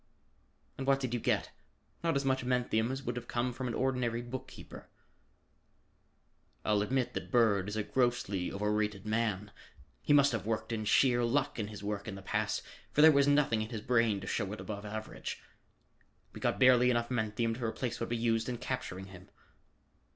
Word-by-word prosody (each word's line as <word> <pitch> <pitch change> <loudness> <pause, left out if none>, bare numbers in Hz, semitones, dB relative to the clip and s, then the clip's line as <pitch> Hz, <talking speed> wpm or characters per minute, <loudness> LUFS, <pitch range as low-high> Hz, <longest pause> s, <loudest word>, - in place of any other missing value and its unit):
"And 135 - -4
what 135 0 +4
did 130 -3 -3
you 120 - 0
get? - - 0 0.5
Not 165 -3 +1
as 140 0 0
much 130 -1 +1
menthium 125 -2 +1
as 135 +1 -4
would 120 -2 -3
have 120 - -6
come 120 +1 -1
from 130 +1 -4
an 115 - -3
ordinary 125 -3 0
bookkeeper." 125 +2 -9 1.8
"I'll 105 -1 +3
admit 125 +4 0
that - - -5
Bird 105 -6 +3
is 105 - -4
a 110 - 0
grossly 120 -7 0
overrated 105 0 -1
man. 110 -2 -1 0.5
He - - -1
must 145 -1 +6
have 115 -5 -2
worked 110 +1 -2
in 110 -2 -2
sheer 120 +3 +4
luck 135 +2 0
in 105 - -2
his 105 -1 -9
work 100 0 -3
in 105 - -5
the 100 - -10
past, - - -1 0.3
for 150 - +4
there 160 - +10
was 140 -1 +4
nothing 145 -6 +3
in 110 - -4
his 115 -3 -5
brain 115 -3 +2
to - - -7
show 100 0 -2
it 110 - -7
above 100 -1 -6
average. 110 +1 -6 0.9
We - - -8
got - - 0
barely 125 -1 +6
enough 120 0 0
menthium 115 -1 0
to 120 +2 -6
replace 120 +1 -2
what 115 - -3
we 120 - 0
used 115 0 +1
in 120 - -3
capturing 95 -7 -4
him." 95 0 -13
115 Hz, 190 wpm, -32 LUFS, 105-125 Hz, 1.8 s, there